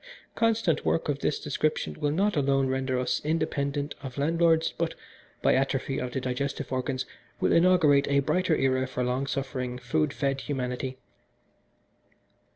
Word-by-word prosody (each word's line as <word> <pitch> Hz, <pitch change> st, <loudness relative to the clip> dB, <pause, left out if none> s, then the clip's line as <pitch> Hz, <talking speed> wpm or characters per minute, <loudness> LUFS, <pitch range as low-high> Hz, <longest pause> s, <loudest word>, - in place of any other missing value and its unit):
Constant 225 Hz, -8 st, +1 dB
work 165 Hz, -, 0 dB
of 140 Hz, -1 st, 0 dB
this 150 Hz, -, 0 dB
description 150 Hz, -, -1 dB
will 145 Hz, -, +1 dB
not 195 Hz, +7 st, +1 dB
alone 135 Hz, -2 st, +2 dB
render 130 Hz, 0 st, -1 dB
us 125 Hz, 0 st, 0 dB
independent 145 Hz, -2 st, -1 dB
of 130 Hz, -1 st, -8 dB
landlords, 165 Hz, +2 st, +2 dB
but, -, -, -2 dB, 0.5 s
by -, -, +5 dB
atrophy 135 Hz, 0 st, 0 dB
of 125 Hz, -, -3 dB
the 130 Hz, -, -2 dB
digestive 135 Hz, +2 st, -3 dB
organs, 130 Hz, 0 st, -1 dB, 0.3 s
will -, -, +2 dB
inaugurate 165 Hz, -5 st, +5 dB
a 140 Hz, 0 st, +3 dB
brighter 180 Hz, +4 st, +1 dB
era 130 Hz, -1 st, +1 dB
for 125 Hz, -1 st, -2 dB
long 125 Hz, +2 st, -1 dB
suffering, 130 Hz, -3 st, -3 dB
food 115 Hz, -12 st, 0 dB
fed 135 Hz, -1 st, -1 dB
humanity. 130 Hz, -1 st, -3 dB
140 Hz, 150 wpm, -27 LUFS, 130-155 Hz, 0.5 s, by